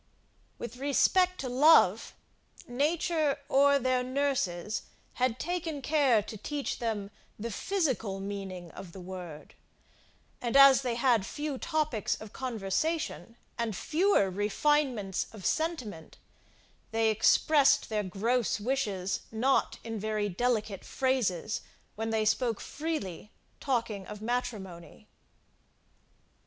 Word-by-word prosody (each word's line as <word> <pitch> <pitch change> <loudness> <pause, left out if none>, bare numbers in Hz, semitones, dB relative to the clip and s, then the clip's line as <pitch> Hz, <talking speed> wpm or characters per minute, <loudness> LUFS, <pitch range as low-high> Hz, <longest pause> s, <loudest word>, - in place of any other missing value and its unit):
With 235 +1 -7
respect 360 +7 +2
to 265 - -3
love, 290 +6 +5 0.5
nature, 305 +3 +1
or 280 +1 +5
their 255 -1 +1
nurses, 250 -8 -1 0.4
had 255 -2 +2
taken 335 -3 -3
care 275 -8 +3
to 215 - -8
teach 290 +6 -4
them 210 -4 -3 0.3
the 230 +2 -5
physical 260 - -1
meaning 195 -3 -6
of 175 -3 -10
the 190 - -9
word; 180 -4 -9 0.9
and, 240 +2 +1
as 275 -1 +8
they 245 -3 -1
had 235 -4 +3
few 295 +5 -4
topics 310 -9 -1
of 215 -1 -10
conversation, 245 - -2 0.2
and 225 -3 -1
fewer 315 - +2
refinements 210 +1 0
of 205 -4 -10
sentiment, 255 - -2 0.7
they 225 0 +2
expressed 275 +6 +4
their 215 -1 0
gross 215 +5 0
wishes 205 -6 -1
not 250 +5 +1
in 225 -2 -5
very 215 0 -1
delicate 215 -1 -1
phrases, 225 -7 -1 0.3
when 225 +1 -3
they 220 -1 +1
spoke 230 +1 +1
freely, 285 - -4 0.3
talking 230 -7 -2
of 210 0 -8
matrimony. 215 -5 -5
235 Hz, 115 wpm, -30 LUFS, 205-275 Hz, 0.9 s, as